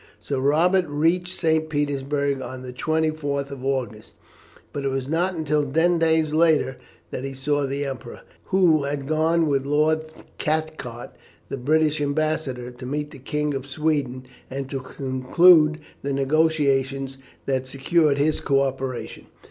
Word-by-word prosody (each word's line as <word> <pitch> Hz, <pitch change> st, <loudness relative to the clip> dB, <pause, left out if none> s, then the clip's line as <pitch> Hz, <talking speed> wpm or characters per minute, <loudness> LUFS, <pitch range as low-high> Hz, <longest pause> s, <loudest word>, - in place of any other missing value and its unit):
Sir 140 Hz, -2 st, -3 dB
Robert 170 Hz, +7 st, +3 dB
reached 170 Hz, +5 st, 0 dB
St. 160 Hz, -1 st, +1 dB
Petersburg 140 Hz, -1 st, -1 dB
on 130 Hz, 0 st, -7 dB
the 125 Hz, -1 st, -7 dB
24th 155 Hz, -1 st, -1 dB
of 135 Hz, -2 st, -8 dB
August, 125 Hz, -5 st, -3 dB, 0.6 s
but 140 Hz, -, -3 dB
it -, -, 0 dB
was 135 Hz, -1 st, -2 dB
not 175 Hz, +5 st, 0 dB
until 150 Hz, -2 st, +1 dB
ten 165 Hz, +5 st, +2 dB
days 160 Hz, -2 st, +2 dB
later 155 Hz, -5 st, +3 dB, 0.3 s
that 130 Hz, -, -4 dB
he 135 Hz, 0 st, -5 dB
saw 145 Hz, +1 st, 0 dB
the 140 Hz, +1 st, -2 dB
Emperor, 130 Hz, -3 st, -7 dB, 0.2 s
who 170 Hz, -6 st, +3 dB
had 140 Hz, -1 st, -3 dB
gone 160 Hz, +2 st, +2 dB
with 140 Hz, -3 st, +1 dB
Lord 155 Hz, +2 st, +2 dB, 0.3 s
Cathcart, 155 Hz, -6 st, -3 dB, 0.4 s
the -, -, -3 dB
British 155 Hz, +3 st, +2 dB
Ambassador, 145 Hz, -4 st, -1 dB
to 125 Hz, +1 st, -10 dB
meet 150 Hz, +2 st, -3 dB
the 140 Hz, -, -11 dB
King 150 Hz, +3 st, -2 dB
of 135 Hz, 0 st, -4 dB
Sweden, 140 Hz, -4 st, -1 dB, 0.2 s
and 135 Hz, 0 st, -4 dB
to 135 Hz, -, -2 dB
conclude 150 Hz, +5 st, +4 dB, 0.2 s
the 140 Hz, 0 st, -2 dB
negotiations 135 Hz, -2 st, +1 dB, 0.3 s
that 130 Hz, -1 st, -1 dB
secured 140 Hz, +2 st, +2 dB
his 150 Hz, +2 st, +1 dB
co 140 Hz, -1 st, +2 dB
operation. 135 Hz, -2 st, -4 dB
145 Hz, 150 wpm, -24 LUFS, 135-155 Hz, 0.6 s, conclude